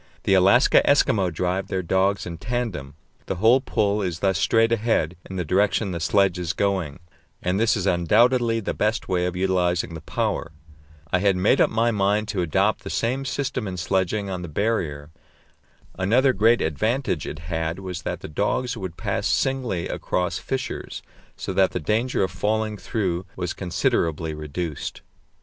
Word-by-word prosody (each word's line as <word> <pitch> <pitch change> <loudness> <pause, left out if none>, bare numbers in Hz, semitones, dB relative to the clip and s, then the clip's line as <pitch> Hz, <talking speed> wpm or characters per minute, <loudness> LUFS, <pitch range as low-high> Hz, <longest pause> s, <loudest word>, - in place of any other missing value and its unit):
The - - +2
Alaska 95 +7 +5
Eskimo 100 -10 +3
drive 90 +3 -1
their 95 -1 -2
dogs 95 +3 +1
in 85 -2 -7
tandem; 105 - -3 0.3
the - - -2
whole 115 +8 +4
pull 105 -5 0
is 90 -4 -2
thus 95 -1 +1
straight 115 0 +3
ahead 110 -7 +1
in 95 - -6
the 90 -2 -2
direction 100 +4 +1
the 85 - -3
sledge 95 +1 +2
is 85 -1 -2
going, 95 -7 -1 0.5
and 90 +2 0
this 115 0 +3
is 95 - -2
undoubtedly 115 +7 +3
the 105 - -3
best 110 +2 -1
way 90 -1 +1
of 90 - -4
utilizing 90 -2 0
the 80 - -7
power. 80 +1 -2 0.6
I 90 - +4
had 100 0 +3
made 90 +3 +3
up - - +4
my 115 +2 +1
mind 105 0 +1
to 100 -4 -1
adopt 95 +5 +1
the - - -6
same 130 +4 -1
system 130 -4 -2
in 90 -1 -5
sledging 95 +4 0
on 95 -2 -4
the 90 - -6
Barrier. 80 -5 -2 0.9
Another 125 +8 +3
great 115 +4 +4
advantage 100 - -1
it - - -5
had 80 0 -3
was 95 -2 -6
that - - -4
the - - -6
dogs 105 - -1
would 95 -6 -6
pass - - -1
singly 125 -10 0
across 90 0 -2
fissures, 130 -1 -4 0.3
so - - -4
that - - +3
the - - -1
danger 110 - 0
of 95 - -1
falling 105 +4 -1
through 95 -4 -2
was 90 -2 -3
considerably 80 -3 -1
reduced. 75 +1 -5
95 Hz, 170 wpm, -24 LUFS, 90-110 Hz, 0.9 s, Alaska